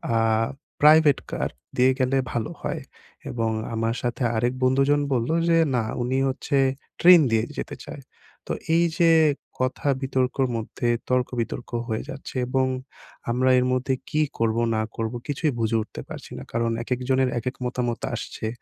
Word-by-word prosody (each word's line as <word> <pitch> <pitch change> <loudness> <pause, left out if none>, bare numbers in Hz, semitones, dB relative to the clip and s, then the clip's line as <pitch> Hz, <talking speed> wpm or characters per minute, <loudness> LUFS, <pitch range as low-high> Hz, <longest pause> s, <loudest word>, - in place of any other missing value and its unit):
আ - - +3 0.6
'private 150 -1 +6
car' - - -2 0.2
দিয়ে 130 +1 +5
গেলে 130 +1 +2
ভালো 115 -2 -2
হয়, - - -3 0.5
এবং 115 -1 -1 0.2
আমার 115 +1 0
সাথে 120 +1 -2
আরেক 120 +3 +1
বন্ধুজন 135 +3 +3
বলল 120 -2 0 0.2
যে 165 - +5 0.2
না 120 - +1 0.2
উনি 130 +2 0
হচ্ছে 135 +2 -1 0.4
'ট্রেন' 175 -3 +8
দিয়ে 110 -1 +3
যেতে - - -4
চায় - - -8 0.5
তো - - +1 0.2
এই 170 +1 +4
যে 170 -1 +6 0.5
কথা 130 +2 -1
বিতর্কের 130 0 0
মধ্যে 115 +1 -2 0.2
তর্ক-বিতর্ক 125 -2 -1 0.2
হয়ে 110 -2 -2
যাচ্ছে, 135 0 -8
এবং 130 +1 +1 0.6
আমরা 130 +2 +2
এর 125 - +1
মধ্যে 130 +1 0 0.2
কি 155 - +1 0.2
করবো 115 0 +1
না 110 - +1 0.2
করবো 115 +1 -2
কিছুই 145 +1 0
বুঝে 115 0 +1
উঠতে 110 - -8
পারছি - - -9
না। - - -7
কারণ 115 0 0
একেকজনের 130 +1 +1
একেক 125 +3 -4
মতামত 120 -1 -2
আসছে। 110 - -4
125 Hz, 155 wpm, -24 LUFS, 115-135 Hz, 0.6 s, ট্রেন